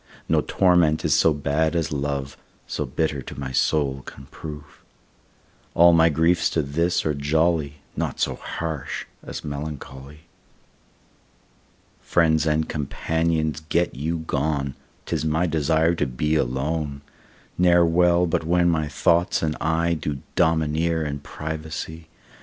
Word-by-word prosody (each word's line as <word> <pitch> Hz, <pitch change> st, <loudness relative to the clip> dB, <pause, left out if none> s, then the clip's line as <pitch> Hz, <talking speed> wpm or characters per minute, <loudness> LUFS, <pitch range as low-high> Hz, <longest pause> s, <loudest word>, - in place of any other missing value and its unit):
No -, -, +3 dB
torment 90 Hz, -4 st, +3 dB
is -, -, +3 dB
so 80 Hz, -, +4 dB
bad 75 Hz, +3 st, 0 dB
as 80 Hz, -1 st, 0 dB
love, 70 Hz, -1 st, -3 dB, 0.3 s
So -, -, -3 dB
bitter 75 Hz, -4 st, -1 dB
to 65 Hz, -, -9 dB
my 65 Hz, -1 st, -4 dB
soul 70 Hz, 0 st, +1 dB
can 65 Hz, -, -11 dB
prove. 75 Hz, -2 st, -9 dB, 0.9 s
All 85 Hz, +1 st, +7 dB
my 80 Hz, 0 st, +5 dB
griefs 80 Hz, +3 st, +2 dB
to 80 Hz, -, +2 dB
this 85 Hz, +5 st, 0 dB
are 75 Hz, -, +1 dB
jolly, 75 Hz, +1 st, +1 dB, 0.2 s
Naught -, -, -3 dB
so -, -, +1 dB
harsh 80 Hz, -5 st, -5 dB, 0.2 s
as -, -, -7 dB
melancholy. 70 Hz, -1 st, -7 dB, 1.8 s
Friends 80 Hz, -2 st, +2 dB
and 80 Hz, 0 st, +1 dB
companions 80 Hz, +1 st, -1 dB
get 85 Hz, +1 st, +1 dB
you 80 Hz, +5 st, -2 dB
gone, 70 Hz, -2 st, -1 dB, 0.3 s
'Tis -, -, -2 dB
my 80 Hz, +3 st, +1 dB
desire 80 Hz, +1 st, +2 dB
to 85 Hz, -, -1 dB
be 70 Hz, +5 st, -1 dB
alone; 70 Hz, +1 st, -1 dB, 0.6 s
Ne'er 90 Hz, -1 st, +5 dB
well 85 Hz, +1 st, +3 dB
but 80 Hz, -, 0 dB
when 85 Hz, +2 st, +3 dB
my 80 Hz, -2 st, 0 dB
thoughts 85 Hz, +5 st, +2 dB
and 75 Hz, -1 st, 0 dB
I 80 Hz, +1 st, +1 dB
Do 75 Hz, -4 st, -4 dB
domineer 80 Hz, 0 st, +1 dB
in 70 Hz, -1 st, -3 dB
privacy. 80 Hz, +2 st, -6 dB
80 Hz, 135 wpm, -23 LUFS, 75-85 Hz, 1.8 s, All